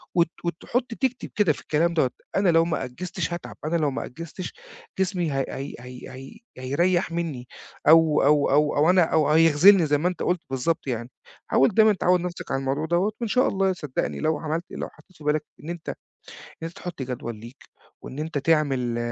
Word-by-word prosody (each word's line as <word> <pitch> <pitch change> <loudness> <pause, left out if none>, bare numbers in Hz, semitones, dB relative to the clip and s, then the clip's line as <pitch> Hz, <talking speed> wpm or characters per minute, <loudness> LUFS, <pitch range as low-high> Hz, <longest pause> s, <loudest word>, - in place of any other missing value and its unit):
وت 170 -1 +4 0.2
وتحط 230 +9 -2
تكتب 255 0 -2
كده 205 -8 +3
في - - -12
الكلام 170 +3 +1
دوّة: 135 -6 +2 0.3
"أنا 195 -2 +3
لو 165 0 +4
ما 160 -5 -1
أجّزتش 170 +6 -4
هاتعب، 170 - -7
أنا 160 +2 0
لو 150 -3 +1
ما 130 - -4
أجّزتش 165 +6 -8 0.5
جسمي 180 -5 0
هي 135 -1 0
هي 135 +1 -6
هي 125 0 -10
هي 135 - -11 0.2
هيريح 170 +7 +1
منّي، 155 -8 -4 0.4
أو 160 -1 +6
أو 145 0 +4
أو 150 +1 +3
أو 150 +3 +4
أنا 180 -1 +5
أو 160 -2 +2
هيخذلني." 165 +4 +6
زَي 145 0 +2
ما 170 +5 0
أنت 180 - -3
قُلت 175 -1 0
بالضبط 135 +3 -1
يعني. 120 -1 -3 0.4
حاول 135 - +4
دايمًا 220 +1 +5
تعوّد 180 -1 +2
نفسك 180 0 -6
على 135 - +1
الموضوع 135 +3 -1
دوّة، 175 +6 +1
وإن 235 - -1
شاء 255 +4 +3
الله، 195 -1 +1
صدقني، 150 -6 -3
لو 155 -1 +1
عملت 160 +2 -3
لو - - -4
حطيت 185 - -22
في 150 - -14
بالك 150 +1 +1 0.2
إن 160 - -7
أنت 170 -2 -6 0.5
إن - - -14
أنت 165 +1 -4
تحط 175 -6 -6
جدول 120 -3 -5
ليك 120 +5 -13 0.4
وإن 135 - -9
أنت 155 -1 -2
تعمل 135 -6 +1
160 Hz, 200 wpm, -25 LUFS, 140-175 Hz, 0.5 s, أو